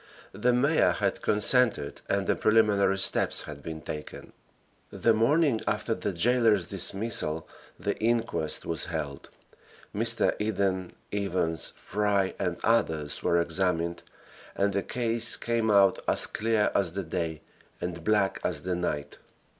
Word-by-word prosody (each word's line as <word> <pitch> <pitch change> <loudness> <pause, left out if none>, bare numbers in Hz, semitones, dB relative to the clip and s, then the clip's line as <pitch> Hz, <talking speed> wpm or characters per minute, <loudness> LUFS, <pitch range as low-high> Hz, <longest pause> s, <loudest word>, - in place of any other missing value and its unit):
The 125 - +1
mayor 140 +6 +3
had - - -1
consented 105 - +2
and 100 -1 +1
the - - +1
preliminary 105 -3 +3
steps 95 - +4
had 75 -2 -9
been 80 +1 -7
taken. 75 0 -8 0.6
The 115 - +2
morning 130 +2 +2
after 105 +2 0
the 105 - -3
jailer's 110 0 +3
dismissal 95 -4 -3 0.3
the - - -2
inquest 115 -8 0
was 80 - -2
held. 75 -5 -5 0.7
Mr. 115 +2 +2
Eden, 95 -4 -1 0.2
Evans, 90 -5 -1
Fry 100 -2 0
and 90 -3 -1
others 80 -10 0
were 85 - +2
examined, 85 0 -1 0.5
and 100 0 +1
the 100 - 0
case 115 0 0
came 115 -1 -1
out 100 -2 +4
as - - +2
clear 110 -1 0
as 90 -4 0
the 100 +1 -3
day 80 -1 -3 0.4
and 85 -1 -5
black 105 -1 +1
as - - -2
the 90 0 -2
night. 75 -5 -3
100 Hz, 135 wpm, -27 LUFS, 85-110 Hz, 0.7 s, steps